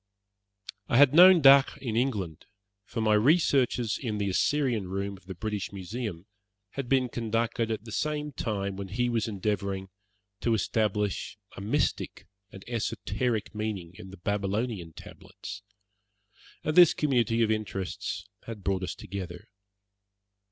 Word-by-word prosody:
I 120 - +2
had 145 0 +7
known 180 +1 +9
Dacre 135 0 +7
in 115 -5 -3
England, 105 - -2 0.4
for 115 - -4
my 110 -1 +3
researches 125 -2 +3
in 110 -5 -2
the 100 -1 -1
Assyrian 120 -3 +1
Room 100 +1 -3
of 95 -1 -19
the 95 - -6
British 105 +1 -4
Museum 100 -1 -5 0.5
had 135 -3 -5
been 130 -2 +3
conducted 115 0 -1
at 110 -1 -3
the 150 +6 -2
time 100 -3 -2
when 100 -1 -5
he 120 +6 -1
was 115 -2 0
endeavouring 100 -2 -2 0.5
to 115 0 +1
establish 105 -1 -1 0.2
a - - -8
mystic 100 - -1 0.3
and 95 - -12
esoteric 115 -1 -2
meaning 105 -5 -4
in 95 +1 -11
the 95 - -11
Babylonian 100 -1 -2
tablets, 105 - -10 1.0
and 155 - -1
this 175 -3 +8
community 120 -5 +2
of 110 - +2
interests 100 -4 -3 0.2
had 110 -4 -7
brought 95 0 0
us 90 - -4
together. 90 -2 -7
110 Hz, 135 wpm, -28 LUFS, 100-120 Hz, 1.0 s, known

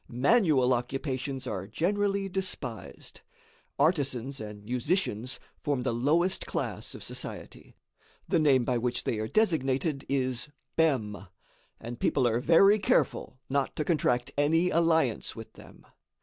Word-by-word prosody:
Manual 135 - +3
occupations 130 +1 -3
are 95 -6 -4
generally 195 - 0
despised. 180 - -5 0.6
Artisans 140 -4 0
and 105 -1 -8
musicians 125 - -1 0.2
form 140 -4 -1
the 125 - 0
lowest 160 +10 +1
class - - -4
of - - -8
society. - - -7 0.5
The 175 - +2
name 135 -5 +4
by 125 -1 +1
which 120 +1 -1
they 110 - -1
are 110 - -2
designated 150 - +1
is 130 0 -1 0.3
Bem, 110 -11 0 0.5
and 120 +1 -7
people 130 -3 +2
are 115 0 +1
very 195 +9 +5
careful 185 - 0
not 140 0 -1
to 150 - -2
contract 130 -6 +1
any 165 +5 +3
alliance 160 -7 +1
with 115 -1 -10
them. - - -15
135 Hz, 130 wpm, -28 LUFS, 120-165 Hz, 0.6 s, very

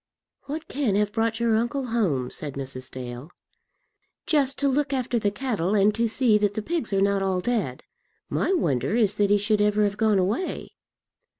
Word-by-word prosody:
"What 300 +3 -5
can 260 -8 0
have 205 0 +1
brought 225 +1 -1
your 230 -1 +2
uncle 240 +4 -1
home?" 145 - 0
said 145 -3 -4
Mrs. 130 -1 -5
Dale. 125 +3 -7 1.0
"Just 280 -4 +2
to 280 - +1
look 275 +1 0
after 250 -2 0
the 205 - +1
cattle, 210 -4 -1
and 205 +1 +4
to 230 +1 +1
see 225 -2 +3
that 205 -1 0
the 215 - -3
pigs 325 -7 -2
are 195 -1 +1
not 200 0 +2
all 190 -1 0
dead. 200 - -2 0.4
My - - 0
wonder 145 - 0
is 215 -4 +3
that 205 -1 +2
he 205 - +5
should 205 +1 +1
ever 210 0 +3
have 205 0 0
gone 215 -2 +3
away." 205 - -2
210 Hz, 190 wpm, -25 LUFS, 195-240 Hz, 1.0 s, he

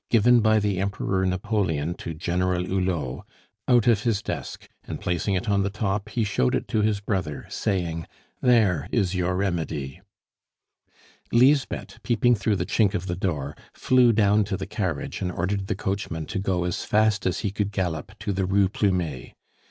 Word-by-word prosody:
"Given 120 +2 +5
by 110 -1 +4
the 100 -3 0
Emperor 95 -1 -1
Napoleon 90 -4 -1
to 80 - -6
General 90 +2 0
Hulot," 90 -9 -2 0.4
out 120 -3 +4
of 115 -4 +4
his 110 -3 0
desk, - - -5 0.2
and - - -6
placing 90 +3 -1
it 90 - -2
on 100 -1 +2
the 100 - 0
top, 105 0 -2
he 115 +1 0
showed 80 -12 +1
it - - -2
to 110 - +1
his 105 -1 +1
brother, 95 -8 -3
saying, 85 -5 -2 0.3
"There 100 - +3
is 100 -6 +1
your 90 0 0
remedy." 85 -5 -2 1.3
Lisbeth, 135 +3 +2
peeping 120 0 +3
through 105 -1 +1
the 90 - -2
chink 105 0 +2
of 90 - -2
the 90 -2 -2
door, 75 -6 -2 0.2
flew 125 -2 +4
down 105 -1 +3
to 95 -1 -2
the 95 - -4
carriage 95 -7 -3
and 90 - -1
ordered 95 +3 -2
the - - -1
coachman 95 -5 -3
to 95 - -3
go 95 -2 0
as 90 0 -2
fast 105 -2 +2
as 95 - -1
he 100 - -1
could 100 0 -2
gallop 95 +1 -3
to 105 -1 -1
the 95 -1 -1
Rue 100 0 +3
Plumet. 90 - -1
95 Hz, 175 wpm, -25 LUFS, 90-105 Hz, 1.3 s, Given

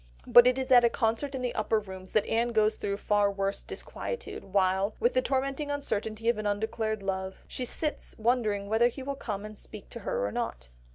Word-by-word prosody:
But 240 0 +8
it 250 +1 +3
is 260 0 -3
at 245 -1 +8
a 235 - +5
concert 230 +5 0
in 255 - -4
the 245 - -1
Upper 215 +1 +1
Rooms 190 -2 -9
that 215 - +3
Anne 235 +1 0
goes 215 -1 +3
through 200 0 -2
far 205 -1 +2
worse 195 0 -2
disquietude, 475 -1 -6
while, 190 +1 +1
with 240 - +2
the 255 - +3
tormenting 275 +2 -1
uncertainty 225 -6 -2
of 235 -2 +3
an 210 - -2
undeclared 220 0 -1
love, 190 -1 -4
she 255 - -3
sits 300 +4 -3
wondering 220 -3 +1
whether 220 +3 +4
he 260 +2 -6
will 280 +1 -2
come 210 -7 -5
to 215 0 -8
speak 210 0 -10
to 235 - -7
her 195 - -1
or 100 - -2
not. - - -4
220 Hz, 215 wpm, -29 LUFS, 200-250 Hz, -, But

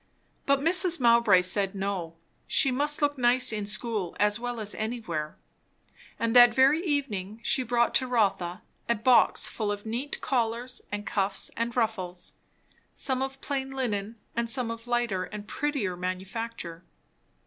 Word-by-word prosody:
But 280 0 +3
Mrs. 350 +2 +3
Mowbray 235 -6 +5
said 195 +1 +2
no; 190 -4 -3 0.3
she 270 - +4
must 295 +3 +2
look 290 -2 +1
nice 245 0 +4
in 210 -1 -3
school 210 -4 -1
as 210 +1 +2
well 245 -1 -4
as 210 -1 0
anywhere; 215 -10 -4 0.8
and 230 +1 -1
that 240 -1 +8
very 275 +6 +4
evening 225 - -2
she 260 - +2
brought 240 -1 +1
to 260 - +2
Rotha 200 -6 0 0.3
a 235 - +3
box 240 +3 +4
full 215 -2 -3
of 205 +1 -5
neat 240 +6 -4
collars 240 0 -2
and 205 0 -4
cuffs 195 -1 -1
and 235 +1 -3
ruffles; 185 -6 -2 0.6
some 260 -1 -1
of 270 0 -4
plain 270 -2 -3
linen 230 -5 -3 0.2
and 235 0 -1
some 240 -2 0
of 230 +1 -8
lighter 240 -6 -1
and 210 0 -9
prettier 275 -11 -2
manufacture. 185 0 -5
230 Hz, 150 wpm, -27 LUFS, 200-255 Hz, 0.8 s, that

